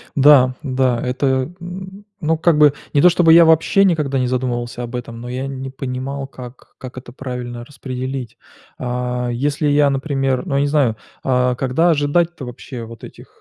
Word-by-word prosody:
Да, 135 -3 +6
да, 130 -3 +1
это 130 +2 -1 0.3
н 190 +3 -9 0.2
ну, 160 0 +1
как 165 -1 +3
бы, 150 -2 +6 0.2
не 145 - +4
то 180 - +8
чтобы 170 -2 +5
я 170 0 +8
вообще 160 +5 +4
никогда 150 -7 +1
не 125 - 0
задумывался 125 -1 -2
об 120 +1 -6
этом, 115 -1 -6
но 120 - -7
я 130 +2 -3
не 135 -1 -6
понимал, 135 +1 -5
как 125 -2 -12
как 130 0 -10
это 125 -1 -10
правильно 125 -2 -6
распределить. 130 -2 -6 0.4
А, 125 0 -2
если 145 +4 -1
я, 145 0 +4
например, 135 -2 -1
ну, 140 - -2
я 140 - +2
не 145 - +1
знаю, 140 -7 +1 0.3
а 125 -1 +1
когда 135 +8 +2
ожидать-то 160 +1 0
вообще 125 0 -8
вот 115 0 -10
этих, - - -13
135 Hz, 180 wpm, -19 LUFS, 125-150 Hz, 0.4 s, то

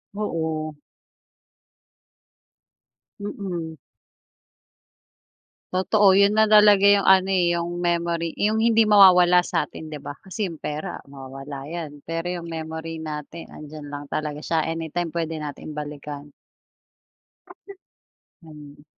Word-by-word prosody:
Oo. 160 -6 -3 2.4
Mm. 180 -6 -5 2.0
Totoo 190 +1 +4
,yun 200 +1 +5
na 220 +1 +4
talaga 210 -2 +6
yung 200 -1 +5
ano 190 0 +5
eh, 180 -3 +2
yung 175 +1 -2
memory 170 -1 0
yung 210 +1 +2
hindi 225 -1 +4
mawawala 180 -3 +7
sa 165 -4 -1
atin, 155 -1 -10
'di 150 - -6
ba? 140 +1 -8
Kasi 195 +2 -3
yung 170 - -7
pera 150 +1 -4 0.2
mawawala 135 +1 -9
yan. 155 -3 -7
Pero 165 +2 -3
yung 170 - -9
memory 160 0 -6
natin 155 +2 -7
'andiyan 150 -1 -10
lang 145 0 -7
talaga 150 0 -4
siya 160 +1 0
anytime 165 +1 -3
pwede 165 -1 -3
nating 150 +1 -7
balikan. 145 -1 -7 2.1
Ganun. 150 -2 -14
165 Hz, 115 wpm, -23 LUFS, 150-185 Hz, 2.4 s, mawawala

